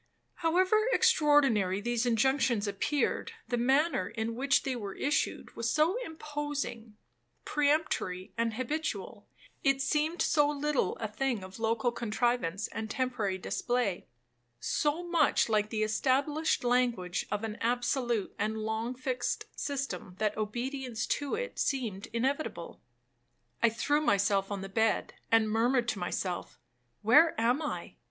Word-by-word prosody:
However 370 +5 +3
extraordinary 290 - +4
these 240 +2 0
injunctions 240 -2 +2
appeared, 235 +8 -1
the 245 - 0
manner 265 - +2
in 225 0 -3
which 260 +2 +2
they 265 -2 -1
were 205 -5 -5
issued 290 +3 -1
was 230 0 -1
so 310 - +3
imposing, 290 - -5 0.5
peremptory, 290 - 0
and 230 -1 0
habitual,—it 285 - -3
seemed 300 +5 0
so 295 -2 +3
little 295 -1 0
a 220 - -3
thing 235 -1 -2
of 190 +3 -10
local 230 +2 +1
contrivance 235 -4 -1
and 220 0 -5
temporary 225 -6 -1
display,—so 175 - -2
much 330 -8 +3
like 215 -1 +2
the 215 0 0
established 275 +9 +1
language 240 -8 +1
of 210 +1 -2
an 220 -1 -4
absolute 240 -2 0
and 215 +2 -1
long 220 +3 -2
fixed 255 0 -2
system, 275 -10 -4
that 210 0 0
obedience 240 +2 -3
to 285 -1 -1
it - - -5
seemed 225 -8 -1
inevitable. 265 +6 -2 0.8
I 235 - +6
threw 290 +7 +1
myself 200 -5 +2
on 200 -1 -3
the 195 - -5
bed, 220 +3 +1 0.2
and 225 -1 +5
murmured 235 +3 +2
to 210 - -2
myself, 175 0 -3 0.5
'Where 295 +7 +5
am 245 +6 +2
I?' 300 - -5
240 Hz, 130 wpm, -30 LUFS, 215-285 Hz, 0.8 s, I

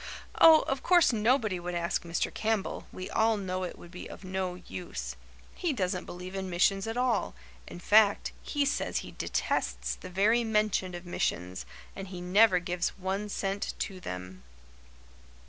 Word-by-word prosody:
"Oh, 320 -1 +9
of 270 0 -2
course 350 -7 +5
nobody 220 -3 +2
would 175 0 -4
ask 170 +1 0
Mr. 170 0 -2
Campbell. 220 -2 -1
We 185 - -6
all 220 0 +3
know 185 -2 -3
it 180 - -5
would 175 - -13
be 180 - -8
of - - -10
no 185 -1 -2
use. 180 0 -6 0.4
He 345 -5 -1
doesn't 185 -5 -1
believe 180 +1 -8
in 190 -1 -4
missions 195 +3 +2
at 225 +2 -3
all 250 - +1 0.3
in - - -9
fact, 205 +2 +4
he 290 -1 0
says 275 - -1
he - - -9
detests - - -1
the 185 - -9
very 210 +6 +3
mention 210 -4 +1
of 175 +1 -8
missions 90 - -2 0.3
and 195 0 -6
he 185 -1 -7
never 185 +2 +5
gives 175 0 -2
one 195 +2 -2
cent 195 0 -2
to 190 -2 -4
them." 90 - -7
190 Hz, 165 wpm, -29 LUFS, 180-220 Hz, 0.4 s, Oh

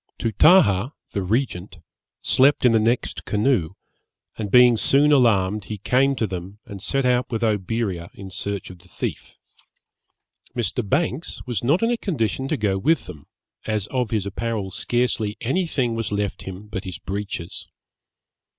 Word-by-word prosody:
Tootahah 115 - +4 0.2
(the 100 - -2
regent) 95 -3 -2 0.5
slept 135 +1 +4
in 125 - +6
the 115 - +4
next 115 +3 0
canoe, 105 -6 +1 0.6
and 105 -2 -4
being 125 +2 +7
soon 140 +6 +3
alarmed, 105 -7 +3
he 105 - -5
came 135 +7 +2
to 115 - 0
them 95 0 -6
and 100 -1 -9
set 135 +5 -1
out 125 0 +2
with 115 -1 -2
Oberea 105 -4 -1
in 95 -1 -9
search 100 0 -4
of 90 - -14
the 90 - -19
thief. - - -6 1.2
Mr. 120 +1 0
Banks 150 +1 -1
was 120 -5 -3
not 150 - +2
in 230 - +2
a 240 - +1
condition 135 - -1
to 155 - -1
go 100 -4 0
with 160 +10 +2
them, 75 -6 -11 0.4
as 105 -3 0
of 125 -4 0
his 105 -4 -1
apparel 100 -1 -3
scarcely 115 -2 -1
any 170 +10 0
thing 125 -7 0
was 115 -2 -3
left 100 -1 -2
him 95 +2 -8
but 105 -2 -5
his 90 -3 -6
breeches. 100 -4 -5
110 Hz, 160 wpm, -23 LUFS, 100-130 Hz, 1.2 s, being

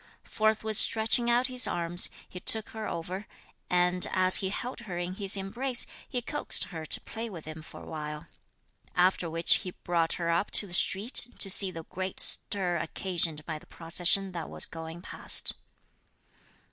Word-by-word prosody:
Forthwith 220 0 0
stretching 225 +2 +4
out 240 +2 +3
his 255 -1 +3
arms, 175 +1 0 0.2
he 180 - -9
took 220 +4 +2
her 220 -1 -6
over, 185 +5 -6 0.4
and, 180 0 +2
as 185 0 +5
he 190 - -2
held 245 +6 -5
her 175 - -4
in 175 +1 -4
his 195 0 +1
embrace, 240 +6 +2 0.2
he 245 -1 -3
coaxed 295 - +3
her 160 -1 -7
to - - -1
play 230 +1 -7
with 170 -6 -10
him 155 0 -8
for 155 - -12
a - - -12
while; 150 0 -7 0.7
after 180 -1 +2
which 165 +1 +4
he 185 - -6
brought 170 -2 0
her 170 -1 -2
up 170 +5 0
to - - 0
the 180 - -8
street 205 +8 +2
to 195 - +2
see 195 0 +1
the 165 -3 -8
great 185 +3 -6
stir 180 -4 0
occasioned 165 -2 -1
by 155 -2 -5
the - - -20
procession 175 +3 +4
that 170 -4 -6
was - - +3
going 165 +1 -9
past. - - +1
185 Hz, 175 wpm, -28 LUFS, 170-210 Hz, 0.7 s, as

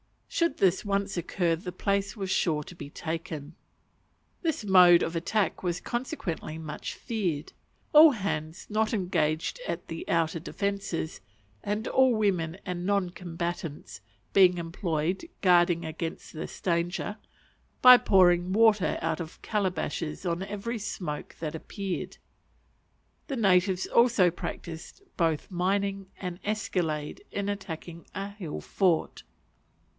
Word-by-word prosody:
Should 335 -4 0
this 190 -1 +3
once 200 -1 -1
occur 170 0 0
the 180 +2 -6
place 200 +2 -1
was 190 -2 -3
sure 155 -4 +1
to 180 - -11
be 155 -4 -9
taken. 160 -1 -5 0.9
This 320 - -1
mode 180 -3 +7
of 165 - -3
attack 190 +5 0
was 180 -1 -1
consequently 240 - -4
much 155 -2 -6
feared; 180 - -3 0.4
all 305 +1 +10
hands 170 - -3
not 215 +1 0
engaged 175 - 0
at - - -4
the 165 - -6
outer 165 0 +1
defences, 195 - -3 0.4
and 210 +2 -2
all 260 -2 +4
women 185 -6 0
and 180 -2 -3
non 195 -2 +1
combatants, 170 -3 -5 0.3
being 185 -2 +6
employed 170 - -2 0.2
guarding 175 -2 +4
against 165 +1 -5
this 155 - -7
danger, 175 +4 -1 0.7
by 250 0 +11
pouring 180 -4 +4
water 215 -2 +4
out 165 0 -1
of 165 -1 -7
calabashes 185 -5 -2
on 170 0 -1
every 210 +4 -4
smoke 175 -7 -5
that 155 -1 -3
appeared. 190 +3 -5 1.1
The 275 - -3
natives 190 -4 +3
also 230 -7 +4
practised 170 - -7
both 165 -2 0
mining 195 +2 0
and 180 -2 -5
escalade 180 - -2
in 200 0 -2
attacking 170 -4 -6
a 195 +1 -3
hill 190 -7 -6
fort. 180 -5 +1
180 Hz, 125 wpm, -28 LUFS, 165-200 Hz, 1.1 s, by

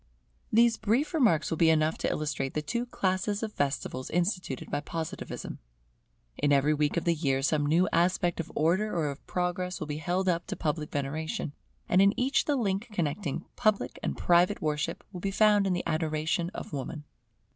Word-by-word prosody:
These 230 0 +5
brief 250 +10 +1
remarks 225 - +3
will 165 - -1
be 165 - +6
enough 155 0 +3
to - - 0
illustrate 145 -3 -2
the 150 - -1
two 235 +10 -2
classes 200 0 -1
of 215 -1 -3
festivals 135 -2 -2
instituted 175 - -2
by - - 0
Positivism. 160 +2 -5 0.8
In 145 0 +2
every 145 +2 +4
week 150 +2 0
of 170 - +1
the 170 - +3
year 135 -4 0
some 145 0 +2
new 170 +5 +3
aspect 175 0 +2
of 165 - -4
Order 185 +7 +2
or 150 -3 0
of 140 - -11
Progress 180 0 -2
will - - -3
be 150 0 -4
held 180 +5 -1
up 170 -1 +1
to 200 - -3
public 155 -2 -2
veneration; 145 +1 -3 0.3
and 185 - +4
in 200 +2 +4
each 260 +3 +2
the 295 - +1
link 205 -3 -1
connecting 165 -3 -2
public 215 -4 +1
and - - -2
private 175 +4 +3
worship 150 +1 -2
will 180 -3 -7
be 195 - -1
found 205 0 +4
in 185 - +1
the 175 - -2
adoration 160 +2 0
of - - -7
Woman. 145 +2 -5
170 Hz, 190 wpm, -29 LUFS, 150-195 Hz, 0.8 s, be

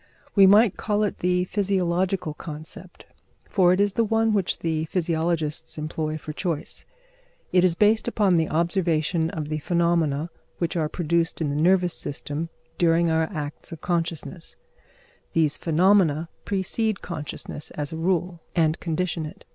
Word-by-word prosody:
We 195 -2 +7
might 205 +1 +5
call 210 -1 0
it 210 - -2
the 180 0 +2
physiological 185 -3 0
concept, 155 0 -10 0.4
for 180 -3 +4
it 185 - +2
is 200 -1 +2
the 230 - +2
one 225 0 +2
which 195 -4 +1
the 160 -1 -1
physiologists 160 -3 -1
employ 155 0 -3
for 155 0 -7
choice. 165 -2 -4 0.6
It 180 -1 +4
is 180 -2 +3
based 215 +4 +3
upon 205 -6 +2
the 160 -1 +1
observation 165 -1 +1
of 155 -2 -5
the 155 0 -2
phenomena 170 -2 +1 0.3
which 170 0 -1
are 155 -3 0
produced 170 0 0
in 155 -3 0
the 145 +2 -1
nervous 180 0 +3
system 145 +3 -4 0.3
during 170 0 +3
our 160 0 +1
acts 150 -3 -6
of 165 -1 -8
consciousness; 170 0 -3 0.8
these 155 -3 +2
phenomena 165 -2 +3 0.2
precede 205 +2 -1
consciousness 155 -2 -6
as 145 +1 -3
a - - -3
rule, 175 0 -1
and 160 -1 +2
condition 165 -1 -2
it. 190 +6 -13
170 Hz, 150 wpm, -25 LUFS, 155-185 Hz, 0.8 s, We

